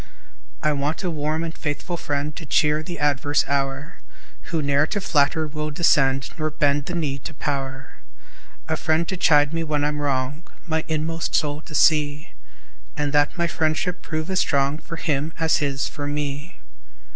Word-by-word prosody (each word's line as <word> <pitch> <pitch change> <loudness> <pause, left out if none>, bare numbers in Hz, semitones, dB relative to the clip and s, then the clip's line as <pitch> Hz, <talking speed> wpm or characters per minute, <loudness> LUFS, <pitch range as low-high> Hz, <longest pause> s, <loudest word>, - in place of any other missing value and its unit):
I 150 - +3
want 145 +4 -1
a 180 - 0
warm 155 +1 -1
and 165 0 -4
faithful 150 +4 -3
friend, 145 -2 -2
To - - -7
cheer 150 0 +2
the 175 +2 -6
adverse 145 0 +2
hour, 140 +2 -2 0.5
Who 160 -2 -1
ne'er 140 +2 +3
to 205 - -2
flatter 155 -2 +2
will 150 0 -3
descend, 135 -4 +3
Nor 155 0 0
bend 145 -2 +1
the 175 - -3
knee 145 -5 -1
to - - -7
power, 135 -2 -4 0.7
A 160 - 0
friend 160 +1 +1
to 190 - -1
chide 150 -4 +4
me 165 0 -1
when 150 -2 0
I'm 150 0 -1
wrong, 140 +1 -1 0.2
My 160 -2 0
inmost 160 +1 -1
soul 150 -1 +1
to 155 - -9
see; 150 -1 +3 0.7
And 145 -1 -1
that 145 +3 +3
my 170 - +2
friendship 165 +2 0
prove 155 +2 -3
as 190 - +2
strong 140 +1 +1
For 165 - -7
him 155 -1 -1
as 160 -1 +3
his 140 -2 -1
for 145 -1 -5
me. 145 +2 -4
150 Hz, 175 wpm, -23 LUFS, 145-160 Hz, 0.7 s, chide